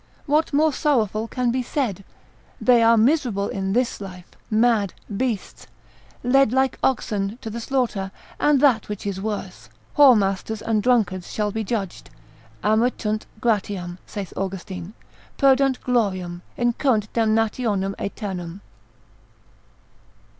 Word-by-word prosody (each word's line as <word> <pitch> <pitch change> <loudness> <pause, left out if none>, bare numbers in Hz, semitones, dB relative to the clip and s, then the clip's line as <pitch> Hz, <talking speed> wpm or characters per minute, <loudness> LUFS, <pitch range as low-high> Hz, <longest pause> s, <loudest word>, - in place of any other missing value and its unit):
What 305 +2 +2
more 300 +1 +3
sorrowful 225 -7 +1
can 250 0 0
be 255 +1 0
said? 235 - -2 0.6
they 245 -2 +5
are 230 0 +5
miserable 230 -5 +2
in 195 0 -2
this 245 -2 0
life, 185 -2 -8 0.2
mad, 220 -3 +2 0.2
beasts, 230 -3 -3 0.6
led 270 -1 +4
like 265 +1 +1
oxen 210 -4 0
to 220 - -5
the 235 - -5
slaughter: 230 -7 -1 0.3
and 295 -2 +4
that 250 -9 +3
which 210 -1 -5
is 195 -1 -3
worse, 190 - -5 0.3
whoremasters 220 -6 +4
and 220 -2 +1
drunkards 205 -7 +1
shall 210 -1 -1
be 220 +2 -2
judged, 200 -4 -4 0.5
amittunt 215 -1 +1
gratiam, 195 -6 -1
saith 200 -3 -6
Austin, 190 0 -5 0.4
perdunt 270 -1 +4
gloriam, 185 -8 -1 0.2
incurrunt 240 -2 +1
damnationem 220 -3 +1
aeternam. 190 -3 -5
220 Hz, 120 wpm, -23 LUFS, 195-250 Hz, 0.6 s, they